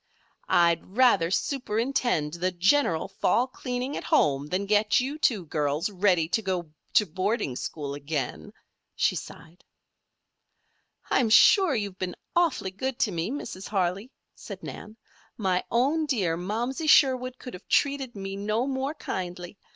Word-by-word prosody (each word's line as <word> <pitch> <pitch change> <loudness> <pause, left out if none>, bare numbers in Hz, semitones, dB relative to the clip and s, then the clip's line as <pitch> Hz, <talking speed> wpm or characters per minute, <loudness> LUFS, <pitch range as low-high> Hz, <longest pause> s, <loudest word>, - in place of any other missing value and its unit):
"I'd 170 +4 +2
rather 220 -10 +4
superintend 230 - -1
the 180 +2 -1
general 180 - +2
fall 245 - +1
cleaning 255 +1 -4
at - - -4
home 140 0 +2
than 185 +5 -2
get 210 +1 +3
you 275 +5 -3
two 210 - +1
girls 150 +4 -1
ready 180 -4 +2
to 225 - +1
go 180 -6 -3 0.2
to 210 - +5
boarding 190 - -2
school 140 +1 -5
again," 145 -2 -4 0.4
she - - +1
sighed. 170 +3 -10 1.5
"I'm 240 -4 +3
sure 355 - +6
you've 200 -4 -4
been 185 -1 -3 0.2
awfully 330 - +1
good 260 +6 -4
to 210 - +2
me, 170 +2 -2
Mrs. 235 -8 -6
Harley," 195 +3 -1 0.2
said - - -10
Nan. 215 +1 -9 0.4
"My 185 -4 0
own 290 +7 +1
dear 195 - 0
Momsey 235 - -3
Sherwood 255 -3 +4
could 250 - -9
have 180 - -11
treated 275 -4 +1
me 195 -1 -5
no 215 +4 -1
more 270 +2 -2
kindly. 180 - -6
205 Hz, 145 wpm, -26 LUFS, 175-255 Hz, 1.5 s, sure